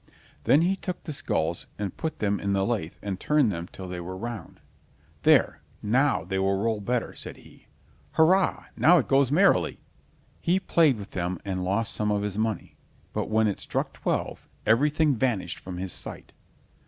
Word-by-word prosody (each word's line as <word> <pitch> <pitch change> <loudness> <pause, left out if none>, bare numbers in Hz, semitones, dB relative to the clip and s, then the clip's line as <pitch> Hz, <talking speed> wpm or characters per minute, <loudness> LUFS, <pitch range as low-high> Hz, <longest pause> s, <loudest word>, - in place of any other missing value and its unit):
Then 145 - +5
he 185 +3 +2
took 180 -2 -5
the 155 - -4
skulls 85 - -1
and 100 -3 -4
put 160 -1 -3
them 100 -1 0
in 100 0 -1
the 95 0 +1
lathe 100 -9 -2
and 100 -2 -3
turned 150 -7 +3
them 85 -1 -5
till 95 - -8
they 90 -1 -5
were 95 +2 -6
round. 115 +2 -7 0.6
"There, - - +4 0.2
now, 130 - +2
they 95 +1 -2
will 95 0 +2
roll 110 +1 0
better!" 120 +4 -1
said - - -7
he. - - -18 0.5
"Hurrah! 185 +4 +3
now 180 +2 +6
it 145 - +1
goes 135 -1 +3
merrily!" 190 +7 +3 0.6
He 180 +3 +2
played 160 -8 +3
with 100 -1 -9
them 90 0 -2
and 95 -2 -2
lost 105 +5 0
some 105 -1 0
of 105 -1 +1
his 105 -2 -2
money, 110 -1 -2 0.4
but - - -2
when 110 0 +3
it 100 - -2
struck - - -3
twelve, - - -3 0.2
everything 145 +6 +3
vanished 105 -8 -1
from 90 -1 -7
his 90 -1 -3
sight. - - -6
110 Hz, 180 wpm, -26 LUFS, 95-145 Hz, 0.6 s, now